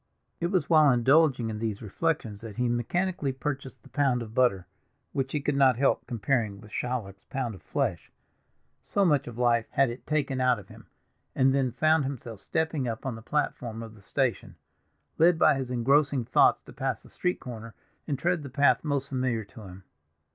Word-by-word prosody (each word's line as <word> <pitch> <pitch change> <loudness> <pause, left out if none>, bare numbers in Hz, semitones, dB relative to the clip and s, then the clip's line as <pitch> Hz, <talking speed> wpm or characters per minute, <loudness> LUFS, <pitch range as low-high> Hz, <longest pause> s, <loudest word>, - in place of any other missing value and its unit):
It 170 - 0
was 175 -6 0
while 155 -3 +6
indulging 130 -1 +3
in 105 - -5
these 110 -2 -2
reflections 115 -2 -2
that 110 -3 -8
he 125 0 0
mechanically 145 +6 -1
purchased 135 0 -5
the - - -16
pound 135 -5 +1
of 110 -1 -10
butter, 115 -8 +2 0.5
which 135 -1 -1
he 150 - 0
could 145 +1 -1
not 135 -3 +4
help 135 +2 +1
comparing 115 -4 -1
with 105 -1 -14
Shylock's 105 -5 -4
pound 130 -4 -3
of 95 - -12
flesh, - - -2 0.7
so 200 - +1
much 145 -6 +2
of 120 -2 -8
life 120 -2 +2
had 135 -3 +2
it 120 - -10
taken 140 -4 0
out 125 -1 +3
of 100 - -12
him, - - -14 0.5
and 130 0 +4
then 135 -2 +1
found 155 +5 +3
himself 120 -6 -6
stepping 160 -5 -1
up 115 +2 -5
on 130 - -2
the 115 - -9
platform 115 -4 -2
of 110 -1 -10
the 105 - -17
station, - - -2 0.6
led 170 +1 +5
by 155 -2 +5
his 135 -2 -3
engrossing 135 +1 +2
thoughts - - +4
to - - -13
pass - - -3
the - - -16
street 180 0 -1
corner 115 -2 -8 0.3
and 145 -3 -1
tread 175 +3 0
the 140 - -7
path 130 -1 +3
most 140 -3 -1
familiar 130 -4 -1
to 105 +3 -14
him. 95 +1 -12
130 Hz, 195 wpm, -28 LUFS, 115-145 Hz, 0.7 s, while